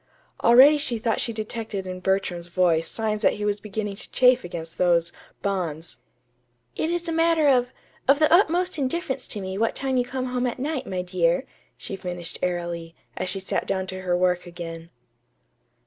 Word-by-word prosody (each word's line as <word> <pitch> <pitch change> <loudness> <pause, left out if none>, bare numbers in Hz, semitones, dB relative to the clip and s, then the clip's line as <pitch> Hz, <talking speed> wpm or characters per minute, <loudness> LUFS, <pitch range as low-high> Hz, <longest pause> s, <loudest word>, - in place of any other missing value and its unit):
Already 270 +6 +8
she 240 -4 -1
thought 225 0 0
she 235 - -1
detected 215 -2 -4
in 185 0 -5
Bertram's 185 -2 -1
voice 170 -2 +2
signs 215 -2 -2
that - - +4
he 210 - -4
was 205 0 0
beginning 210 -1 -4
to - - -8
chafe 255 0 +4
against 165 -2 -7
those 175 -1 +2 0.3
"bonds." 175 -5 -3 0.8
"It 315 - -1
is 345 0 -1
a - - -1
matter 330 -1 +3
of 250 -2 +3 0.4
of 275 +2 +6
the 310 +2 +4
utmost 355 -1 +3
indifference 275 +1 -2
to 210 - -2
me 190 +1 -4
what 230 - +1
time 265 -1 -1
you 250 - +3
come 255 +1 -4
home 250 0 +1
at 240 - -3
night, 270 0 -3
my 185 -1 -2
dear," 180 +4 +1 0.3
she 195 - -5
finished 175 -2 -5
airily, 170 -2 -3 0.2
as 185 - -3
she 195 - -2
sat 190 - -2
down 190 -1 -1
to 185 0 -6
her 180 -1 +1
work 180 0 +1
again. 165 -1 -8
200 Hz, 185 wpm, -25 LUFS, 180-255 Hz, 0.8 s, Already